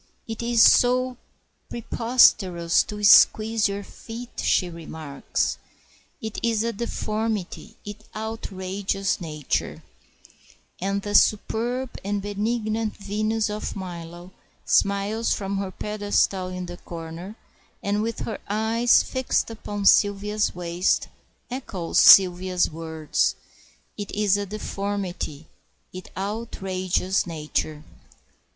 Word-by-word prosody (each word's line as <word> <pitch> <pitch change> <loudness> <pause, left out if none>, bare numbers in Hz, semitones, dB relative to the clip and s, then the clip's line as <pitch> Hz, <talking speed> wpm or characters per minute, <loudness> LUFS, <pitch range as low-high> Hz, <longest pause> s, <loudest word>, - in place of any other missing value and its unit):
"It 225 0 -5
is 235 -1 +4
so 255 +1 +4 0.5
preposterous 205 -8 +3
to 210 0 -7
squeeze 215 +1 +6
your 200 0 -4
feet," 235 +4 -8
she 180 - +2
remarks; 160 -4 -3 0.6
"it 220 -1 -5
is 225 -2 +1
a 230 0 -1
deformity, 215 -2 -3
it 210 +1 -8
outrages 195 -3 -3
nature;" 150 -4 -3 1.0
and 195 +1 -1
the 205 - -4
superb 240 +5 +1
and 205 +1 -1
benignant 215 +2 -2
Venus 215 +2 -1
of 210 +1 -4
Milo 175 -1 -8 0.3
smiles 200 +3 +1
from 195 -1 -3
her 195 -1 -3
pedestal 205 -1 0
in 180 0 -5
the 175 0 -8
corner, 170 +4 -8 0.5
and 205 +1 0
with 230 +1 -3
her 220 - -4
eyes 225 +3 +3
fixed 260 -2 -1
upon 205 -2 -5
Sylvia's 205 +1 +3
waist, 175 +1 0 0.4
echoes 210 -10 -2
Sylvia's 180 -1 +6
words, 160 -1 -1 0.6
"It 205 - -4
is 205 -2 +2
a 205 0 -2
deformity, 195 -6 -4 0.5
it 185 0 -9
outrages 190 -3 -1
nature." 155 -1 -3
200 Hz, 105 wpm, -24 LUFS, 185-220 Hz, 1.0 s, squeeze